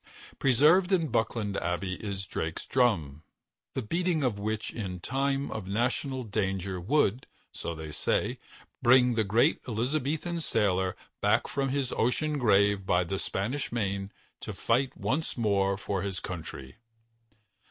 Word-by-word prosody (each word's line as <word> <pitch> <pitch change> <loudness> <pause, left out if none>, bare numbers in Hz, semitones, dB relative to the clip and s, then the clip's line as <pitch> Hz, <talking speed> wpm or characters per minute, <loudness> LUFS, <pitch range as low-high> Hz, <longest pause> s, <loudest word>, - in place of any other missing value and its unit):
Preserved 155 +9 +5
in 165 -5 +2
Buckland 110 -3 0
Abbey 90 +2 -1
is 100 -2 -4
Drake's 80 -2 -4
Drum, 85 - +1 0.5
the 130 - -1
beating 170 +5 0
of 115 -6 0
which 110 +1 -3
in 95 -5 -4
time 135 +5 -1
of 105 -4 -5
national 125 +5 -1
danger 95 -4 -2
would, 125 - +1 0.2
so 85 - -5
they 80 -1 -7
say, - - 0 0.4
bring 125 0 +6
the 110 -1 +2
great 115 +9 +3
Elizabethan 145 +8 -1
sailor 95 - +1 0.3
back 105 +3 +3
from 135 0 -1
his 135 -2 -1
ocean 145 +6 +1
grave 100 -4 +4
by 90 -1 +2
the 95 +3 -3
Spanish 120 +9 -2
Main 100 -4 -2 0.3
to - - -6
fight 125 +3 0
once 155 +1 -1
more 100 -3 +2
for 100 -1 -2
his 95 -2 -3
country. 70 -6 -7
110 Hz, 140 wpm, -29 LUFS, 95-135 Hz, 0.5 s, bring